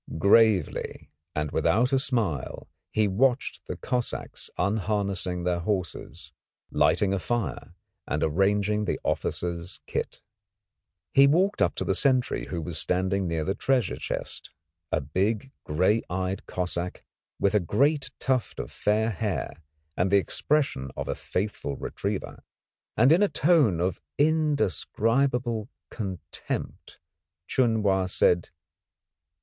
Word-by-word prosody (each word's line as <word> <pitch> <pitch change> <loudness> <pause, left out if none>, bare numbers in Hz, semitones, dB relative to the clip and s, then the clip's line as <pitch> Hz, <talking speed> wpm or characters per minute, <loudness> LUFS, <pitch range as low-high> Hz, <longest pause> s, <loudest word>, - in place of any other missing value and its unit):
Gravely 100 -1 +3 0.2
and 75 -1 -1
without 125 +6 +2
a 135 - +4
smile 105 - -1 0.2
he 110 -1 +2
watched 125 +7 +1
the - - -4
Cossacks 125 -2 -3
unharnessing 100 -2 -1
their 90 -1 0
horses, 90 -3 -4 0.4
lighting 100 -1 +3
a 100 - 0
fire 120 +4 -3 0.3
and 75 0 -1
arranging 100 +5 +2
the - - -1
officers' 85 0 -2
kit. - - -3 0.9
He 140 0 +7
walked 185 +8 +2
up - - +3
to - - -2
the - - +1
sentry 130 -3 +1
who 85 -3 -4
was 80 0 -3
standing 95 +1 0
near 80 -2 -1
the 95 - 0
treasure 120 - +1
chest, - - -5 0.4
a 75 - +1
big, 100 - -1
grey 95 +9 +2
eyed 95 +1 -3
Cossack 90 0 -3 0.4
with 100 - +2
a 105 - +5
great 140 - +1
tuft 130 -6 -1
of - - -5
fair 110 +2 +1
hair, 105 -2 -2 0.4
and 90 +4 +1
the 100 - +5
expression 115 - 0
of - - -3
a - - 0
faithful 90 -8 -3
retriever, - - -4 0.5
and 125 +6 +6
in 170 +5 +5
a 205 - +4
tone 145 - +3
of 90 +1 -1 0.2
indescribable 130 - +1 0.2
contempt, 95 -6 -5 0.5
Chun 115 -2 +2
Wa 95 -2 +2
said 90 -1 +3
"Ping!" - - -25
100 Hz, 130 wpm, -27 LUFS, 90-125 Hz, 0.9 s, He